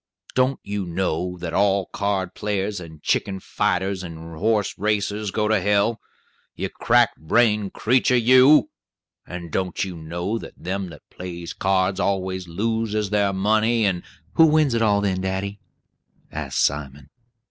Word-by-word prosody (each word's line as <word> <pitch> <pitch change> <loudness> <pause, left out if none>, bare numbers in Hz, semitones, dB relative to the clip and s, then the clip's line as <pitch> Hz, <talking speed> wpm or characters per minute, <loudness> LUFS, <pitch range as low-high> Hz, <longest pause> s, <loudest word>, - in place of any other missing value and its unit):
Don't 130 +1 +2
you 100 -2 -3
know 90 0 -2
that 85 -1 -5
all 100 -1 +2
card 100 -3 -2
players 105 -1 -2
and 80 -3 -11
chicken 95 -1 0
fighters 95 +1 -1
and 80 -2 -8
horse 105 +4 +1
racers 105 0 0
go 105 +2 0
to 110 -2 +2
hell? 105 +4 +2 0.6
You - - -3
crack - - +3
brained 105 +4 +2
creetur, 125 +2 +2
you! 130 - +6 0.6
And 85 -2 -7
don't 90 +1 -1
you 95 -2 -5
know 85 +7 -3
that - - -10
them 95 +1 -4
that 75 -4 -14
plays 85 -2 -7
cards 95 0 +1
always 95 -2 -1
loses 105 +2 -1
their 100 -1 +2
money, 110 +4 +2
and 90 -3 0 0.2
" - - -35
"Who 165 - +8
wins 155 -4 +3
it 115 - +1
all, 105 -2 +3
then, 95 -2 0
daddy?" 95 +2 -3 0.7
asked - - 0
Simon. 70 0 -4
100 Hz, 150 wpm, -23 LUFS, 90-105 Hz, 0.7 s, Who